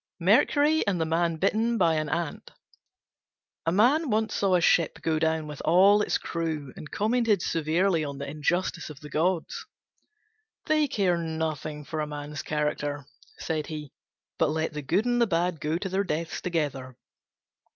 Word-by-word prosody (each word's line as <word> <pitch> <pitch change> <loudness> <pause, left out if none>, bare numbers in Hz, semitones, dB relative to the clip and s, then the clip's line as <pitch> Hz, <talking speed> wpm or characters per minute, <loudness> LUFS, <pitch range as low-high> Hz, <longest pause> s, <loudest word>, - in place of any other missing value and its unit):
MERCURY 290 - +3
AND 190 -3 +1
THE 160 - +1
MAN 165 +1 +1
BITTEN 220 +7 +1
BY 165 -6 +3
AN 155 -1 -1
ANT 170 0 -3 1.2
A - - +3
Man 260 - +3
once 220 0 0
saw 195 -2 +2
a - - +4
ship 170 -1 +2
go 160 -1 +1
down 160 0 0
with 150 -2 -8
all 195 +5 +5
its - - +1
crew, 160 -5 -4
and 150 - -9
commented 220 -3 +1
severely 165 +2 +1
on 140 -2 -5
the 140 0 -5
injustice 160 +4 -1
of 150 -2 -10
the 150 -1 -10
gods. 170 +2 -1 1.0
"They 310 -1 +2
care 190 -8 +1
nothing 160 -2 -3
for 155 - -4
a 150 - -1
man's 145 0 -6
character," 150 -1 -2 0.3
said 155 -2 -3
he, 150 -3 -7 0.5
"but - - +3
let 160 +1 -1
the 150 - -4
good 175 - 0
and 240 0 +1
the 235 - +4
bad 170 -3 0
go 155 +2 0
to 190 - -4
their 190 +1 0
deaths 165 -2 -3
together." 140 -7 -3
165 Hz, 170 wpm, -27 LUFS, 150-195 Hz, 1.2 s, all